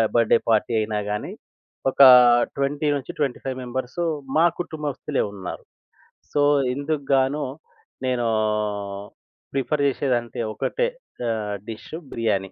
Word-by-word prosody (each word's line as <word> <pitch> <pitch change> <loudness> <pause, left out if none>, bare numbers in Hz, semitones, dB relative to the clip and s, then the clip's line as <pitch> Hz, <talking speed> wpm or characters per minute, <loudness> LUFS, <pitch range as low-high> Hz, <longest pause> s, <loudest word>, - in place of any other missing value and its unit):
Birthday 115 0 +4
party 110 +2 +2
అయినా 105 -1 -1
గాని, 105 - -3 0.6
ఒక - - +1 0.6
20 145 +2 0
నుంచి 130 - -7
25 135 -2 -2
మెంబర్సు 130 +6 -3 0.3
మా 165 - +6 0.2
కుటుంబస్తులే 150 -3 -3
ఉన్నారు. 95 -2 -7 0.7
సో 145 - +1 0.3
ఇందుగ్గాను 140 -1 0 0.6
నేనూ 125 -2 0 1.3
ప్రిఫర్ 140 +2 0
చేసేదంటే 125 -4 -1
ఒకటే 485 - -1 0.4
ఆహ్, 105 -2 -2
డిషు 115 +8 -7 0.2
బిర్యానీ. 100 -5 -1
130 Hz, 100 wpm, -23 LUFS, 115-145 Hz, 1.3 s, మా